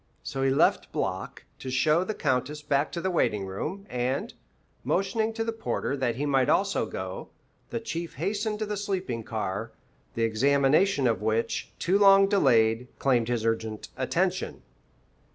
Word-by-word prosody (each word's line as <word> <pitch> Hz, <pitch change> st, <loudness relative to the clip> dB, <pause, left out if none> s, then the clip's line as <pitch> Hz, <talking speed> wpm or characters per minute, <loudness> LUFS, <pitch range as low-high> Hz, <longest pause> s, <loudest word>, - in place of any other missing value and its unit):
So 135 Hz, -, -4 dB
he 135 Hz, -, +3 dB
left 135 Hz, -, +2 dB
Block -, -, -3 dB, 0.2 s
to 130 Hz, -, -6 dB
show 150 Hz, +6 st, +3 dB
the 215 Hz, +3 st, -4 dB
Countess 135 Hz, +4 st, -1 dB
back 145 Hz, 0 st, +1 dB
to 170 Hz, -, -3 dB
the 185 Hz, -, -1 dB
waiting 105 Hz, -, +1 dB
room, 155 Hz, -, -5 dB
and, 125 Hz, 0 st, -2 dB, 0.5 s
motioning 220 Hz, +4 st, 0 dB
to 225 Hz, 0 st, -2 dB
the 230 Hz, -, -1 dB
porter 225 Hz, -9 st, -2 dB
that 125 Hz, -4 st, -1 dB
he 140 Hz, +4 st, -2 dB
might 135 Hz, -3 st, +2 dB
also 200 Hz, 0 st, +2 dB
go, -, -, -6 dB, 0.4 s
the 235 Hz, -, -3 dB
Chief 170 Hz, -7 st, -5 dB
hastened 210 Hz, -, -1 dB
to 215 Hz, -, -2 dB
the 210 Hz, 0 st, -3 dB
sleeping 190 Hz, -, -2 dB
car, 105 Hz, -4 st, -4 dB, 0.4 s
the 115 Hz, -, 0 dB
examination 140 Hz, -, +3 dB
of 115 Hz, -3 st, +1 dB
which, 110 Hz, +1 st, -1 dB
too 190 Hz, +4 st, +2 dB
long 195 Hz, -1 st, +7 dB
delayed, 120 Hz, -, +3 dB
claimed 125 Hz, -4 st, +2 dB
his 120 Hz, -2 st, -1 dB
urgent 110 Hz, -1 st, -2 dB
attention. 180 Hz, +8 st, -1 dB
140 Hz, 160 wpm, -27 LUFS, 120-195 Hz, 0.5 s, long